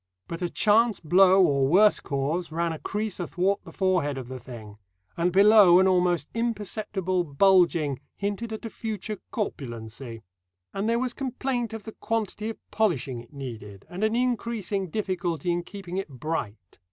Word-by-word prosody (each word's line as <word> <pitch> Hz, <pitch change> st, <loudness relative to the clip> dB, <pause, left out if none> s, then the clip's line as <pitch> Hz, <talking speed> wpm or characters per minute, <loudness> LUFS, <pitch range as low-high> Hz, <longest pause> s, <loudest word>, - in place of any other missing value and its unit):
But 170 Hz, +1 st, -6 dB
a 175 Hz, -, -1 dB
chance 220 Hz, +3 st, +3 dB
blow 185 Hz, +3 st, +5 dB
or 140 Hz, -4 st, +2 dB
worse 200 Hz, +8 st, +5 dB
cause 150 Hz, +5 st, -2 dB
ran 170 Hz, +1 st, -1 dB
a 160 Hz, -, -7 dB
crease 210 Hz, -1 st, -3 dB
athwart 185 Hz, +3 st, 0 dB
the -, -, -11 dB
forehead 180 Hz, -7 st, 0 dB
of 130 Hz, -2 st, -7 dB
the 130 Hz, -1 st, -6 dB
thing, 110 Hz, -4 st, -11 dB, 0.4 s
and 175 Hz, +1 st, +1 dB
below 200 Hz, -1 st, +7 dB
an 190 Hz, +1 st, +5 dB
almost 180 Hz, -4 st, +2 dB
imperceptible 210 Hz, -5 st, -2 dB
bulging 170 Hz, -3 st, +3 dB, 0.2 s
hinted 205 Hz, +3 st, -3 dB
at 220 Hz, +1 st, -6 dB
a -, -, -4 dB
future 215 Hz, -2 st, -5 dB
corpulency. 120 Hz, -, -5 dB, 0.5 s
And 200 Hz, +3 st, -1 dB
there 230 Hz, -, +2 dB
was 250 Hz, 0 st, -1 dB
complaint 255 Hz, -2 st, -2 dB
of 225 Hz, -2 st, -7 dB
the 220 Hz, -, -8 dB
quantity 220 Hz, -1 st, -3 dB
of 225 Hz, -, -6 dB
polishing 140 Hz, -, 0 dB
it 120 Hz, -, -18 dB
needed, 110 Hz, -8 st, -8 dB
and 185 Hz, +4 st, -4 dB
an 220 Hz, +1 st, +2 dB
increasing 230 Hz, -6 st, -1 dB
difficulty 180 Hz, -3 st, -2 dB
in 175 Hz, 0 st, 0 dB
keeping 185 Hz, 0 st, -7 dB
it 195 Hz, -4 st, -3 dB
bright. 120 Hz, -, -5 dB
185 Hz, 165 wpm, -26 LUFS, 145-210 Hz, 0.5 s, below